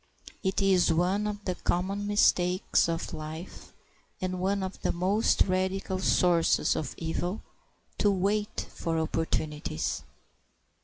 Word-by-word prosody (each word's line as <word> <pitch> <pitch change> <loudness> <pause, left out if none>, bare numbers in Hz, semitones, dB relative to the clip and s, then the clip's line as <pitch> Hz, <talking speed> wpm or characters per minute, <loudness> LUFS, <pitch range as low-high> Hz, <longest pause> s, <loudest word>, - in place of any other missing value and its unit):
It 190 +1 0
is 185 -3 +4
one 185 +5 +1
of 205 -1 -5
the 185 - 0
common 195 +4 -1
mistakes 185 -4 +3
of 165 0 -3
life, 155 +3 -8 0.5
and 185 -1 -2
one 195 +1 0
of 190 0 -6
the - - +1
most 190 +5 +2
radical 190 0 -1
sources 175 -2 +3
of 155 - -3
evil, 175 +4 -3 0.6
to 205 - +4
wait 205 +2 0
for 165 -1 -2
opportunities. 155 - -2
185 Hz, 120 wpm, -28 LUFS, 170-195 Hz, 0.6 s, is